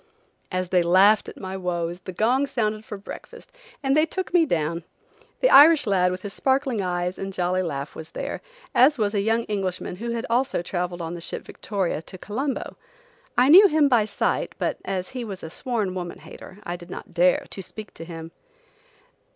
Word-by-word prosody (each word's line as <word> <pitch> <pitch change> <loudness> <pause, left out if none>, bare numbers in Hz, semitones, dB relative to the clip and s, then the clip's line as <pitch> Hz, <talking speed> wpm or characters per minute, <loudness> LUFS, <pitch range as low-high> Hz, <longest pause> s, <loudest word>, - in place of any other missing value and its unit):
As 185 -1 -2
they 180 -1 +4
laughed 190 +5 +5
at - - -12
my 190 -1 -5
woes 175 -2 -2
the 185 - -8
gong 245 +9 +2
sounded 215 -5 -1
for 210 -1 -7
breakfast 195 - -11 0.3
and 270 0 +2
they 310 +1 +4
took 375 +1 -4
me 335 -3 +5
down. 165 - -1 0.6
The - - +5
Irish 300 0 +8
lad, 185 -3 +3
with 185 0 -5
his 200 -1 -5
sparkling 265 -4 +1
eyes 180 0 -2
and 195 0 -4
jolly 185 0 0
laugh, 140 -5 -4
was 160 0 -8
there, - - -4 0.3
as 275 +4 +5
was 210 -2 0
a 200 - +1
young 225 +3 +1
Englishman 190 -4 -3
who 235 +4 -4
had 235 0 -2
also 245 -5 0
traveled 175 -1 -3
on 165 +1 -4
the 170 - -7
ship - - -4
Victoria 190 -7 -3
to 185 - -11
Colombo. 255 +8 -4 0.6
I 250 +2 +5
knew 385 +6 +10
him 310 -4 +3
by 240 -6 +4
sight, - - -1
but - - -2
as 185 -2 -3
he 255 -2 -5
was 200 -5 -7
a 160 - -7
sworn 215 -3 -2
woman 175 -2 -5
hater 185 - -12
I 175 -2 -4
did 175 0 -13
not 180 - -9
dare 180 +1 +3
to 195 - -5
speak 210 +3 -9
to - - -8
him. 165 -1 -8
195 Hz, 200 wpm, -24 LUFS, 180-240 Hz, 0.6 s, knew